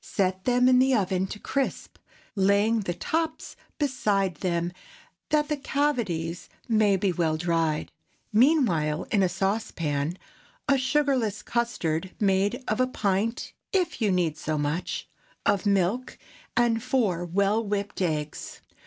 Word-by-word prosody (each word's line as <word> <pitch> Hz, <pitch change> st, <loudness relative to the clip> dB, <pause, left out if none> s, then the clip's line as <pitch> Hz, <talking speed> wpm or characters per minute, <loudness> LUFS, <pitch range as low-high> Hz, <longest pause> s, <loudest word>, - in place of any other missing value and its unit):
Set 185 Hz, -1 st, -1 dB
them 250 Hz, 0 st, +4 dB
in 255 Hz, -1 st, +6 dB
the 260 Hz, 0 st, +4 dB
oven 190 Hz, -3 st, 0 dB
to 210 Hz, -, -6 dB
crisp, 275 Hz, +5 st, -3 dB, 0.4 s
laying 200 Hz, +3 st, +3 dB
the 190 Hz, -4 st, -2 dB
tops 320 Hz, -, -2 dB, 0.2 s
beside 205 Hz, -, +1 dB
them 175 Hz, -1 st, -1 dB, 0.6 s
that 300 Hz, -1 st, +2 dB
the 300 Hz, -, 0 dB
cavities 235 Hz, -, -1 dB, 0.2 s
may 215 Hz, -4 st, +3 dB
be 190 Hz, 0 st, +1 dB
well 165 Hz, -3 st, 0 dB
dried. 165 Hz, -2 st, 0 dB, 0.4 s
Meanwhile, 210 Hz, -, +3 dB
put -, -, -9 dB
into 195 Hz, -3 st, +4 dB
a -, -, -5 dB
saucepan 175 Hz, -5 st, -1 dB, 0.5 s
a 275 Hz, -1 st, +4 dB
sugarless 255 Hz, -6 st, +1 dB
custard 190 Hz, -8 st, -1 dB
made 205 Hz, +4 st, +1 dB
of 215 Hz, -, 0 dB
a 255 Hz, -, +3 dB
pint—if 230 Hz, -, -2 dB
you 210 Hz, -3 st, +3 dB
need 170 Hz, -4 st, 0 dB
so 155 Hz, -1 st, -2 dB
much—of 175 Hz, +6 st, -2 dB
milk, 200 Hz, +6 st, +1 dB, 0.4 s
and 235 Hz, -2 st, +3 dB
four 220 Hz, -9 st, 0 dB
well 200 Hz, +5 st, +1 dB
whipped 200 Hz, -1 st, -3 dB
eggs. 155 Hz, -4 st, -3 dB
200 Hz, 130 wpm, -26 LUFS, 175-245 Hz, 0.6 s, in